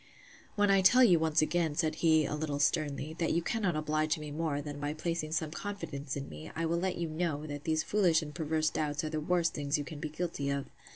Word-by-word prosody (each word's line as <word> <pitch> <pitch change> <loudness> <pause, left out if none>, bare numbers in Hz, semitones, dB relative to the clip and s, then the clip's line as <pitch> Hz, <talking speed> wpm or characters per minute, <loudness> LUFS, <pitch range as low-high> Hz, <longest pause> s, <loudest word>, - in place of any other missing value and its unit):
When 205 -1 +3
I 195 -1 +5
tell 245 +7 +7
you 180 -8 +6
once 160 -1 +2
again, 160 -2 0
said 160 -1 +1
he, 160 -2 +4
a - - -3
little 150 -1 -2
sternly, 145 0 0
that 165 - +1
you 170 +1 +1
cannot 200 -6 0
oblige 155 0 0
me 150 -1 -7
more, 155 -1 -1
than 145 0 -6
by 145 +1 -2
placing 160 -1 -2
some 160 -1 -1
confidence 155 -8 -5
in 140 - -5
me, 75 +1 -9
I 165 - -1
will 170 +1 0
let 185 +1 -1
you 170 -1 -2
know, 155 -2 -2
that 145 -1 -6
these 160 0 +1
foolish 175 -6 +3
and 150 -1 -8
perverse 155 -1 0
doubts 150 +1 -1
are 155 - -2
the 155 - -1
worst 170 +1 +1
things 145 0 0
you 145 - -2
can 150 0 -8
be 155 - -4
guilty 155 -3 -3
of. 140 0 -1
155 Hz, 240 wpm, -31 LUFS, 150-170 Hz, -, tell